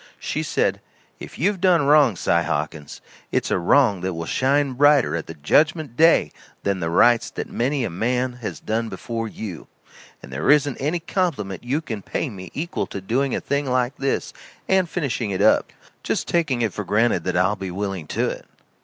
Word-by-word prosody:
She - - -3
said: - - 0 0.4
"If - - -10
you've 190 +4 0
done 175 -6 +4
wrong, 145 -6 +5
Si - - -2
Hawkins, 75 -2 -1 0.3
it's - - 0
a - - +2
wrong 100 +1 +3
that 90 -1 -2
will 80 0 -4
shine 135 - +1
brighter 145 - +4
at 85 - -4
the 80 - -8
judgment 150 - +1
day 160 - +4 0.3
than 100 -1 0
the 85 -2 -2
rights 120 +7 +4
that - - -5
many 130 +3 0
a - - -1
man 125 +7 -1
has 110 - -5
done 115 +1 -2
before 115 +3 -4
you. 100 -6 -7 0.6
And 65 - -10
there 70 - -1
isn't 145 -3 +4
any 155 +6 -1
compliment 160 - -2
you 135 +6 -1
can 110 -9 -5
pay 135 - -3
me 95 -3 -9
equal 170 +5 -3
to - - -6
doing 125 +8 0
a - - -1
thing 140 0 -2
like 125 +1 0
this 135 0 -2 0.3
and 190 -2 +2
finishing 135 -10 -2
it 95 - -2
up, - - +4 0.3
just - - -2
taking 140 -8 +1
it 110 -5 -1
for 105 - -4
granted 105 -2 +1
that 90 -1 0
I'll 95 +3 +2
be 95 -2 -6
willing 95 -3 -4
to - - -1
it. - - -6
120 Hz, 195 wpm, -22 LUFS, 95-145 Hz, 0.6 s, wrong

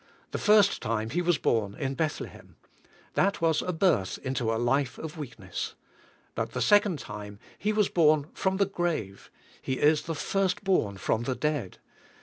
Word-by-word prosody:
The - - -3
first 210 -2 +4
time 110 0 -2
He 175 - 0
was 175 -2 +2
born 105 -3 0
in 135 -1 -2
Bethlehem. 155 +1 -4 0.6
That 195 +2 +2
was 160 -2 +2
a 180 - -2
birth 160 - +1
into 130 -4 -1
a 115 - 0
life 125 +2 +1
of 160 0 -7
weakness. 120 - -6 0.6
But 115 0 -3
the 125 - -2
second 205 - +4
time, 105 -4 -8 0.2
He 210 - +1
was 210 -1 +2
born 155 -3 +3
from 190 0 0
the 200 - +3
grave; 170 - -3 0.3
He 130 - -2
is 150 +3 +3
the 165 - -4
"first 195 +4 0
born 115 - +1
from 115 +3 -1
the 130 - -1
dead." 145 -11 -2
150 Hz, 170 wpm, -28 LUFS, 115-180 Hz, 0.6 s, first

